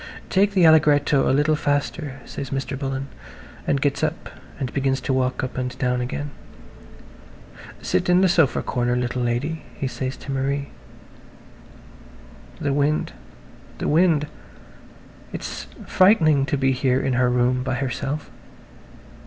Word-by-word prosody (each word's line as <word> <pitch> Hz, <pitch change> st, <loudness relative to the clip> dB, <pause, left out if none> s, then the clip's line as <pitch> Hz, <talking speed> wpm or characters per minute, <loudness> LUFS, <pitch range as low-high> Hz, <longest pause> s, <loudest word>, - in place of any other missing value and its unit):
"Take 200 Hz, +2 st, +3 dB
the 180 Hz, -3 st, +5 dB
allegretto 150 Hz, -3 st, +4 dB
a -, -, +3 dB
little 145 Hz, +3 st, +3 dB
faster," 145 Hz, -1 st, -2 dB
says 135 Hz, -, -6 dB
Mr. 135 Hz, 0 st, -3 dB
Bullen, 135 Hz, 0 st, -3 dB, 0.6 s
and 140 Hz, -, +2 dB
gets 140 Hz, 0 st, 0 dB
up -, -, -2 dB, 0.3 s
and 130 Hz, -3 st, -3 dB
begins 135 Hz, -1 st, 0 dB
to 135 Hz, -, -1 dB
walk 130 Hz, +1 st, 0 dB
up 130 Hz, 0 st, -4 dB
and 125 Hz, 0 st, -4 dB
down 125 Hz, -1 st, 0 dB
again. 145 Hz, +4 st, -4 dB, 1.5 s
"Sit 90 Hz, -, 0 dB
in 180 Hz, +1 st, +5 dB
the 190 Hz, -, +5 dB
sofa 165 Hz, -7 st, +2 dB
corner, 120 Hz, 0 st, 0 dB
little 125 Hz, 0 st, -1 dB
lady," 125 Hz, +7 st, -1 dB
he 140 Hz, -, -4 dB
says 130 Hz, +1 st, -4 dB
to 140 Hz, -, -7 dB
Marie. 140 Hz, +1 st, -1 dB, 1.9 s
The 145 Hz, -3 st, 0 dB
wind, 145 Hz, +2 st, 0 dB, 0.6 s
the -, -, -3 dB
wind. 160 Hz, -1 st, +3 dB, 1.1 s
It's -, -, -6 dB, 0.2 s
frightening 155 Hz, -8 st, +4 dB
to 145 Hz, -, 0 dB
be 135 Hz, 0 st, +2 dB
here 130 Hz, 0 st, +1 dB
in 135 Hz, -, 0 dB
her 125 Hz, 0 st, +3 dB
room 125 Hz, +1 st, +2 dB
by 130 Hz, 0 st, -2 dB
herself. 135 Hz, +3 st, -3 dB
135 Hz, 140 wpm, -23 LUFS, 130-150 Hz, 1.9 s, the